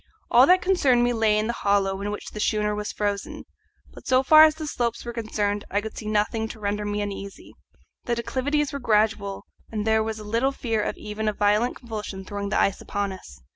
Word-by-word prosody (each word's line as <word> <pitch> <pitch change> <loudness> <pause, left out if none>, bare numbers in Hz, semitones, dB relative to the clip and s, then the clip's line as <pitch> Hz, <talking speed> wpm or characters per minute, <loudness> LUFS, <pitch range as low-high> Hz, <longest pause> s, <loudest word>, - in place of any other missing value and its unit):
All 250 +3 +7
that 365 0 +5
concerned 280 -10 +3
me 245 0 +2
lay 220 -2 +2
in 215 - +1
the 235 - -1
hollow 200 -2 0
in 205 - -3
which 210 - -6
the 210 - -7
schooner 210 0 +1
was 210 0 -4
frozen; 205 -1 -3 0.5
but - - -13
so 260 0 +4
far 310 +3 +9
as 310 -1 +2
the 315 -1 -6
slopes 240 -6 -2
were 240 - -5
concerned 210 -3 -2
I 200 - +1
could 220 +1 -7
see 215 - -7
nothing 215 +1 0
to 220 - -10
render 210 0 -2
me 205 0 -2
uneasy. 200 -1 -7 0.5
The 240 - 0
declivities 280 +5 -1
were 280 - -3
gradual, 215 -4 0 0.3
and 215 -1 -3
there 220 0 +3
was 220 0 -3
little 230 +6 0
fear 225 -5 -1
of - - -3
even 215 +1 -4
a - - -2
violent 210 +4 +2
convulsion 210 -5 -7
throwing 200 +1 -4
the - - +1
ice 195 - +1
upon 205 -1 -3
us. 65 - -11
215 Hz, 215 wpm, -25 LUFS, 205-240 Hz, 0.5 s, far